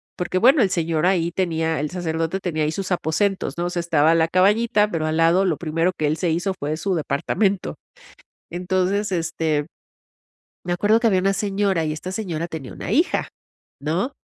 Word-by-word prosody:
porque 180 +1 -2
bueno, 260 +8 +5
el 200 - +3
señor 165 -1 0
ahí 170 -3 +1
tenía 165 -3 -1
el 150 - -2
sacerdote 165 +1 -2
tenía 160 -5 -2
ahí 150 - 0
sus 190 +3 -4
aposentos, 185 +3 -1
¿no?, 175 - -1
o - - -1
sea, 175 - -2
estaba 160 -2 +3
a - - +4
la 165 -1 +3
cabañita, 210 +4 +3
pero 155 -2 -1
al 155 0 -1
lado 170 +4 +4
lo 170 -5 0
primero 165 +2 0
que 155 - -1
él 150 +2 0
se 175 - 0
hizo 175 +4 0
fue 150 +2 -2
su 195 +3 -1
departamento, 180 +6 -1 0.8
entonces, 185 +3 -1
este, 160 -4 -1 1.0
me 175 - -2
acuerdo 210 +5 +3
que 230 - +3
había 190 -3 +2
una 195 +1 +1
señora, 195 -3 0
y 155 - -1
esta 170 +4 -6
señora 175 -6 -3
tenía 155 -7 -7
una - - -7
hija, 320 +10 +1 0.5
¿no?, 165 - -1
175 Hz, 195 wpm, -22 LUFS, 160-195 Hz, 1.0 s, bueno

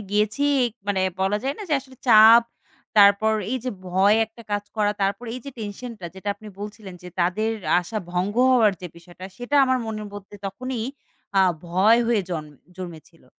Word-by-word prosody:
গিয়েছি। 210 +7 +1 0.4
মানে 200 -2 0 0.2
বলা 195 +2 +1
যায় 270 +2 -1
না - - -6
যে - - -2
আসলে 260 -1 -17
চাপ। 225 0 +8 0.5
তারপর 205 +1 +6 0.2
এই 260 - 0
যে 255 - -1 0.2
ভয় 195 +4 +4
একটা 225 +1 -15
কাজ 205 0 -1
করা, 210 -1 +2
তারপর 195 +4 -1
এই 255 - -6
যে 280 - -6
টেনশনটা 215 -1 -7
যেটা 190 +2 -7
আপনি 215 +1 -12
বলছিলেন 205 -2 -8
যে, 180 - -9
তাদের 185 +6 +1 0.3
আশা 195 +5 -5
ভঙ্গ 185 +3 -1 0.2
হওয়ার 230 -5 +5
যে 180 - -6
বিষয়টা 175 +2 -13
সেটা 245 +4 -1
আমার 260 -1 +1
মনের 215 -1 -5
মধ্যে 205 0 -10
তখনই 245 +4 -4 0.6
আ - - +7 0.3
ভয় 190 +7 +4
হয়ে 230 -4 +2
জন 160 -3 -3 0.3
জন্মেছিলো। 165 -4 -10
210 Hz, 175 wpm, -23 LUFS, 190-230 Hz, 0.6 s, চাপ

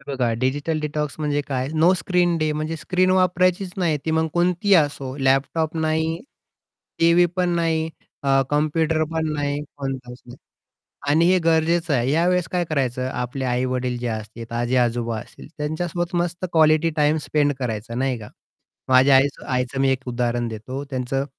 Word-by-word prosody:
हे 135 - -21
बघा 125 -3 0
digital 145 +4 0
detox 150 -1 -3
म्हणजे 145 -1 0
काय 130 -1 -1
नो 165 +4 +5
स्क्रीन 175 0 +1
डे 155 0 0
म्हणजे 155 +2 -3
स्क्रीन 185 +3 +1
वापरायचीच 185 0 +2
नाही. 165 -5 +1
ती 160 - -1
मग 160 0 +2
कोणतीही 180 +3 +2
असो 145 -4 +1
लॅपटॉप 140 +4 +1
नाही, 160 +1 0 0.8
टीव्ही 170 +1 +5
पण 180 -1 +1
नाही 160 -1 0 0.3
अ, 135 -1 +3
कॉम्प्युटर 155 +2 +1
पण 160 -1 -1
नाही, 145 -1 -2 0.2
कोणताच 130 -3 -6
नाही. 120 +2 -11 0.7
आणि 160 +3 +4
हे 185 - +4
गरजेचं 165 -1 +2
आहे. 125 +1 +1
या 165 +3 +2
वेळेस 180 -1 +1
काय 175 -1 0
करायचं 130 -4 -1
आपले 125 +2 -4
आई-वडील 125 0 -1
जे 120 0 -3
असतील, 110 +1 -5
आजी-आजोबा 120 -1 0
असतील - - -12
त्यांच्यासोबत 175 +4 -3
मस्त 175 +1 -3
क्वालिटी 155 0 +4
टाईम 150 +1 +3
स्पेंड 145 -1 +2
करायचा 115 -1 -4
नाही 130 0 0
का. 105 - -10 0.6
माझ्या 130 +1 +6
आईचं 135 +1 +2
आईचं 125 +1 -1
मी 135 - +3
एक 130 0 -3
उदाहरण 120 -1 -1
देतो. 120 +5 -6
त्यांचं 135 +1 -2
150 Hz, 165 wpm, -22 LUFS, 130-165 Hz, 0.8 s, माझ्या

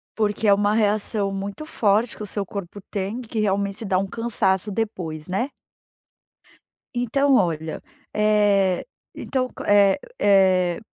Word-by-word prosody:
Porque 215 0 0
é 200 - +7
uma 205 +1 +2
reação 210 -1 +1
muito 200 +8 -5
forte 220 -5 +1
que - - -6
o - - -4
seu 200 0 -3
corpo 200 0 -7
tem 205 +5 -3
que 225 -2 -5
realmente 200 +1 -1
dá 190 -2 +1
um 195 +1 0
cansaço 210 -3 -1
depois, 180 -8 -4
né? 195 +9 -1 1.5
Então 270 +3 +2
olha, 160 -7 0 0.3
eh, 205 -3 +3 0.3
então 255 -2 -2
c - - -21
eh 200 +2 +5 0.2
eh, 185 -3 +4
205 Hz, 135 wpm, -23 LUFS, 190-220 Hz, 1.5 s, é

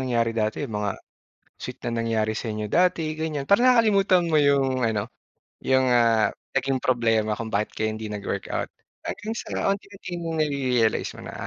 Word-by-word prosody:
nangyari 120 -3 0
dati, 110 +5 -1
mga 105 -2 -2 0.6
sweet - - -8
na - - -1
nangyari 110 -1 0
sa 110 0 -3
inyo 105 0 -3
dati, 165 - +1
ganyan. 155 -3 -3
Parang 245 +5 +5
nakakalimutan 200 -6 +4
mo 160 - +1
'yong 135 -3 +2
ano 110 -1 0 0.5
'yong, 130 0 +3
ah, 115 -2 +3 0.2
naging 135 -1 0
problema 115 -4 +1
kung 115 -1 -6
bakit 105 +1 0
kayo 110 0 0
hindi 110 -1 -6
nag-workout 105 -1 -3 0.4
hanggang 220 +2 -4
sa - - -2
unti-unti 200 -1 -5
mong 165 -1 -4
nare-realize 130 -6 +1
mo - - -9
na, - - -8
130 Hz, 160 wpm, -25 LUFS, 110-160 Hz, 0.6 s, Parang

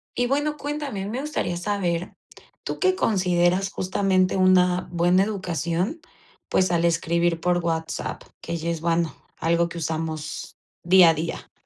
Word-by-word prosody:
Y 245 0 +1
bueno, 290 +3 0
cuéntame, 285 -9 -4
me 240 +6 -3
gustaría 285 - -2
saber, 180 -3 -2 0.5
¿tú - - -4
qué 375 0 +3
consideras 185 - +1
justamente 185 0 +1
una 180 -1 +3
buena 175 +2 +3
educación? 185 - -2 0.5
Pues 185 -1 +2
al 170 -1 +1
escribir 170 0 +1
por 175 +1 +1
WhatsApp, 165 -1 -3 0.2
que 170 - -4
ya 165 +1 -3
es 165 -2 -4
bueno, 165 -1 0 0.2
algo 170 +1 +1
que 170 - -8
usamos 160 -1 -4 0.3
día 180 0 +7
a - - +4
día. 160 +1 -5
175 Hz, 145 wpm, -24 LUFS, 170-195 Hz, 0.5 s, día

